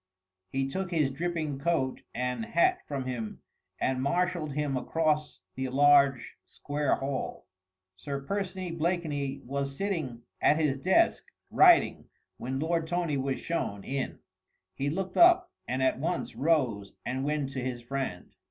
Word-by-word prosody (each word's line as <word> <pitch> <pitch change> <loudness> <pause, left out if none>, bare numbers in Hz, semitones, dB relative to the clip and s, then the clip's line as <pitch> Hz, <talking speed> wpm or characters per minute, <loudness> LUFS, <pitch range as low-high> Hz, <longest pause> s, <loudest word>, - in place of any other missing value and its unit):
He 135 +5 -1
took 190 +6 -3
his 155 -6 +1
dripping 155 -1 -2
coat 140 -4 0
and 125 - -1
hat 365 +11 +2
from 140 -3 -3
him 120 -4 -5 0.4
and 130 -1 0
marshalled 170 +1 0
him 145 -1 -1
across 150 -3 0
the 130 0 -3
large, 140 -1 +4
square 145 -1 -1
hall. 135 0 -4 0.5
Sir 140 +9 -4
Percy 185 +2 -3
Blakeney 155 -5 -2
was 140 +1 -3
sitting 155 - -2 0.2
at 150 - +5
his 145 -4 +1
desk, 190 - +3 0.3
writing, 355 -2 +5 0.3
when 130 +2 -3
Lord 165 +1 0
Tony 175 -3 0
was 135 0 -1
shown 100 -12 -3
in. 135 -1 -3 0.6
He 135 +8 -1
looked 185 +4 -3
up 350 +1 +6 0.2
and 130 +1 -1
at 130 - +2
once 170 +4 -2
rose 125 -11 +1
and 130 +1 -2
went 145 -1 -1
to 135 - -4
his 125 -1 -4
friend. 130 -8 -4
145 Hz, 145 wpm, -29 LUFS, 130-170 Hz, 0.6 s, up